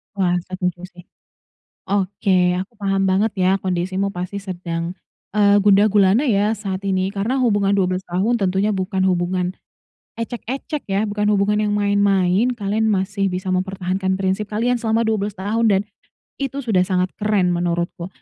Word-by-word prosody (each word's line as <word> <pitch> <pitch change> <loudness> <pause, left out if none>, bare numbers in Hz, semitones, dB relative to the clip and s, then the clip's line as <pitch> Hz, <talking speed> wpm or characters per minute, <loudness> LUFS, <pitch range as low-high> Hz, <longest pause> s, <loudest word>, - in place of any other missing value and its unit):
Wah 180 -3 +1
setuju 180 -1 -3
sih. 175 -1 -15 0.8
Oke 190 -2 +1
aku 190 +5 -6
paham 195 -1 0
banget 200 +3 +2
ya 185 0 +3
kondisimu 185 +2 -1
pasti 180 +2 -5
sedang, 175 -3 -4 0.4
eee 205 -1 +5
gundah-gulana 205 +2 +4
ya? 210 -2 +2
Saat 195 -3 -5
ini 190 -1 0
karena 220 +7 -1
hubungan 205 -5 +2
12 185 -1 0
tahun 200 +7 +1
tentunya 195 +2 +1
bukan 190 0 -2
hubungan. 180 0 0 0.6
Ecek-ecek 245 +5 -4
ya? 195 +2 +1
Bukan 210 0 -1
hubungan 210 +1 +2
yang 210 -1 0
main-main 200 +1 +2
kalian 215 +1 0
masih 195 0 0
bisa 185 +1 -4
mempertahankan 190 0 -1
prinsip 195 +2 -1
kalian 235 +4 0
selama 225 0 +1
12 210 -2 -1
tahun 215 +5 0
dan, 195 -1 +3 0.6
itu 275 0 -3
sudah 215 -6 +2
sangat 185 0 0
keren 205 -4 +2
menurutku, 175 0 -2
195 Hz, 145 wpm, -20 LUFS, 185-210 Hz, 0.8 s, eee